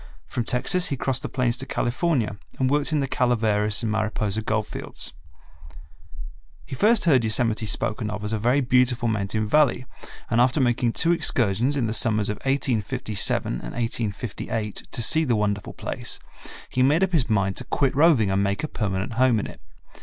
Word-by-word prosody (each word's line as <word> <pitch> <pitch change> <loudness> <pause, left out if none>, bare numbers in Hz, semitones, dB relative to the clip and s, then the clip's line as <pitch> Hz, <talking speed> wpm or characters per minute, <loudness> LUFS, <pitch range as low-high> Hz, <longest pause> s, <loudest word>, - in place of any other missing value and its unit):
From 120 - -4
Texas 140 +10 +1
he 140 - -2
crossed 135 0 0
the - - -5
plains 125 -2 0
to 135 - -5
California 125 -4 -1 0.2
and 130 0 0
worked 145 +2 +1
In 150 -2 +1
the 135 - -1
Calaveras 110 -5 +1
and 110 - -1
Mariposa 110 -1 -1
gold 110 0 -1
fields. - - -6 1.5
He - - -9
first 210 - +2
heard 135 -8 +4
Yosemite 110 0 0
spoken 105 +1 -1
of 105 0 -5
as 105 +1 -2
a 110 - -1
very 125 +6 +2
beautiful 125 -1 +2
mountain 110 0 -1
valley 135 -1 +2 0.5
and 115 +1 +3
after 125 +4 +2
making 120 -2 +1
two 165 - +2
excursions 130 - +2
in 125 - 0
the 110 - -2
summers 110 -3 +4
of 105 - -3
1857 115 - -1
and - - -5
1858 115 -2 -4
to 120 - 0
see 160 +7 +5
the 125 -6 +1
wonderful 105 -1 -2
place, - - -5 0.5
he 125 - -1
made 150 +8 +3
up 190 - 0
his 155 -10 +1
mind 100 -3 +1
to - - -2
quit 135 -1 0
roving 140 - +4
and 95 +1 +1
make 100 +4 -1
a - - -1
permanent 100 -3 -3
home 125 -4 +4
in - - -3
it. - - -11
120 Hz, 185 wpm, -24 LUFS, 105-135 Hz, 1.5 s, see